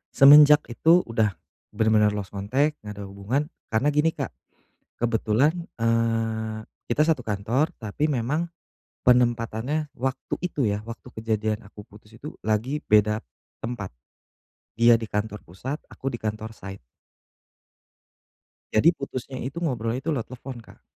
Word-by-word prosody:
semenjak 150 +2 +9
itu 165 +9 +4
udah 110 -4 0 0.4
bener-bener 105 -1 +3
lost 100 -3 -5
contact, 130 +10 0
nggak 105 -1 -8
ada 100 - -7
hubungan 105 - -2 0.2
karena 110 +7 +1
gini 150 +2 +2
Kak, - - -4 0.6
kebetulan, 115 +4 +2 0.3
eee, 115 -1 0 0.2
kita 130 +6 +2
satu 155 -3 +2
kantor 115 +7 0
tapi 115 +7 -2
memang 145 +4 0 0.6
penempatannya 125 +4 +2
waktu 130 +2 -2
itu 150 -6 -1
ya 100 0 -1
waktu 115 +2 -9
kejadian 110 0 -2
aku 105 0 -12
putus 105 +1 -18
itu 150 +6 -8
lagi 110 +7 -1
beda 105 0 +4 0.4
tempat, 115 -5 -5 0.8
dia 115 0 +6
di 115 - -5
kantor 105 0 -3
pusat 130 - -6
aku 135 0 -5
di 120 - -5
kantor 110 +1 -4
site. 95 - -10 1.9
Jadi 110 +10 +6
putusnya 130 -1 -6
itu 135 +7 -5
ngobrol 120 -8 -1
itu 130 +5 -3
lewat 130 -5 -2
telepon 130 0 -8
Kak. 115 - -15
115 Hz, 135 wpm, -25 LUFS, 110-135 Hz, 1.9 s, semenjak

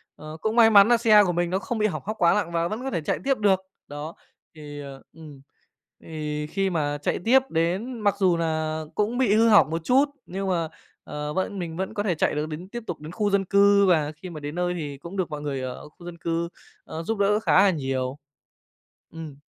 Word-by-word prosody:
ờ, 155 +1 -9
cũng 220 +1 -1
may 230 -2 +7
mắn 200 -2 +7
nà 240 0 +5
xe 215 -3 +6
của 185 - 0
mình 175 0 -1
nó 190 +2 0
không 225 +4 -4
bị 215 0 +2
hỏng 205 - -5
hóc 215 +2 -4
quá 170 -1 +4
nặng 205 -5 -1
và 170 0 0
vẫn 215 +5 -5
có 270 - -3
thể 170 - -2
chạy 150 - -2
tiếp 270 -1 +1
được. 200 -3 +3 0.3
Đó, 145 +3 -7 0.4
thì, 145 -1 -9
ờ, 140 -1 -10
ừm, 150 -4 -13 0.6
thì 150 -1 -4
khi 195 +4 -1
mà 145 -4 -1
chạy - - -1
tiếp 255 +4 +6
đến 185 +10 -1
mặc 205 -2 +1
dù 185 -3 +3
nà 160 -1 -1
cũng 215 +4 0
bị 245 -6 +3
hư 225 +1 +4
hỏng 205 -7 +6
một 165 0 -3
chút, 270 - +3 0.2
nhưng 195 +2 -4
mà, 170 -3 0 0.4
ờ, 150 0 -5
vẫn 190 +2 -2
mình 165 -2 -5
vẫn 190 +1 -3
có 205 - -2
thể 190 -5 0
chạy 150 - 0
được 150 +1 -2
đến 165 +4 -7
tiếp 240 +2 -6
tục 175 - -5
đến 155 +1 -8
khu 205 +3 -1
dân 195 -1 +2
cư 200 +1 +5
và 155 -5 +2
khi 160 +4 -10
mà 160 -3 -8
đến 145 +1 -6
nơi 180 0 -1
thì 150 -5 -5
cũng 170 +7 -9
được 185 - -1
mọi 150 -1 -6
người 140 -3 -3
ở 130 +3 -7
khu 170 +3 -17
dân 175 -1 -8
cư, 170 0 -2 0.4
ờ, 160 - -6
giúp 225 +6 -2
đỡ 205 +1 +3
khá 220 - +4
là 200 - +5
nhiều. 135 -4 -3 1.0
Ừm. 160 -3 -8
175 Hz, 245 wpm, -25 LUFS, 155-205 Hz, 1.0 s, may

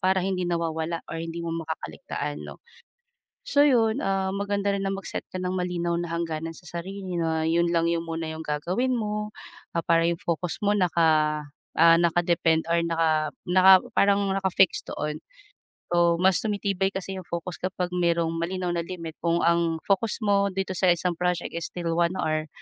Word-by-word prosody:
para 190 0 +2
hindi 185 -1 -1
nawawala 165 -1 -2
or 165 - -5
hindi 165 +1 -5
mo 170 - -4 0.2
makaka-ligtaan 150 -2 -5
'no. - - -10 0.9
So 285 -12 +3
yun, 235 -3 +3
ah, 195 -1 0
maganda 200 0 0
rin 195 - -2
na - - 0
mag-set 195 -1 -5
ka - - -3
ng 180 0 -2
malinaw 175 -1 -1
na 175 - -5
hangganan 165 -1 -3
sa 180 - -16
sarili 190 +1 -6
na 160 -1 0
yun 170 +1 +2
lang 165 0 +2
yung 170 0 0
muna 165 0 -3
yung 160 0 -6
gagawin 185 - 0
mo, 210 -1 -2 0.4
ah, 170 - 0
para 165 0 +4
yung 170 - -1
focus 170 -2 -2
mo 205 - +4
naka 160 -5 +2 0.4
ah, 165 +1 +7
naka-depend 170 -1 +2
or 170 - +4
naka 160 -2 +1 0.2
naka 190 +1 +7 0.2
parang 200 0 +3
naka-fix 190 -1 +2
doon. 150 0 -3 0.7
So 170 -1 +4
mas 185 -1 +4
tumitibay 200 -2 0
kasi 190 0 -5
yung 180 - -12
focus 170 0 -4
kapag 185 -1 -2
merong 170 -2 +1
malinaw 180 +1 -2
na 170 - -1
limit 165 -3 -7
kung 170 0 +2
ang 170 -1 +2
focus 205 +4 +1
mo 200 -1 +3
dito 195 0 -2
sa 185 - +2
isang 175 +1 0
project 180 -1 -1
is 170 0 -3
still 170 -2 -3
1 170 +1 +2
hour 155 0 -1
175 Hz, 180 wpm, -26 LUFS, 165-190 Hz, 0.9 s, ah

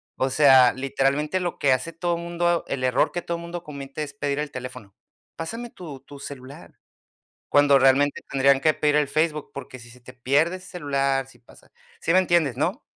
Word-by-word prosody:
O 130 - 0
sea, 130 -3 +6
literalmente 135 +5 0
lo 175 -1 -3
que 135 -2 +3
hace 130 +6 -2
todo 170 +1 -1
mundo 170 0 -1
el 130 -2 -3
error 125 0 +2
que 175 - -4
todo 170 0 -3
mundo 170 0 -7
comete 140 -1 -7
es 140 -1 -8
pedir 140 0 -2
el 150 -1 -3
teléfono. 125 -5 -9 0.4
"Pásame 230 +8 -6
tu 150 -7 -10
tu 140 +1 -13
celular", 135 -1 -11 0.7
cuando 145 -1 +5
realmente 135 +2 +3
tendrían 135 0 +3
que 155 - +3
pedir 150 -1 +1
el 150 -2 +2
Facebook, 155 +1 -1
porque 135 -1 -9
si 120 0 -14
se 125 +1 -17
te 125 +1 -14
pierde 145 +8 +1
ese 185 0 -13
celular, 140 -5 -1
si 135 - -19
pasa 120 - -21 0.3
¿sí 165 - 0
me 185 - +6
entiendes, 170 -8 +1
no? 185 - -1
145 Hz, 195 wpm, -24 LUFS, 135-170 Hz, 0.7 s, sea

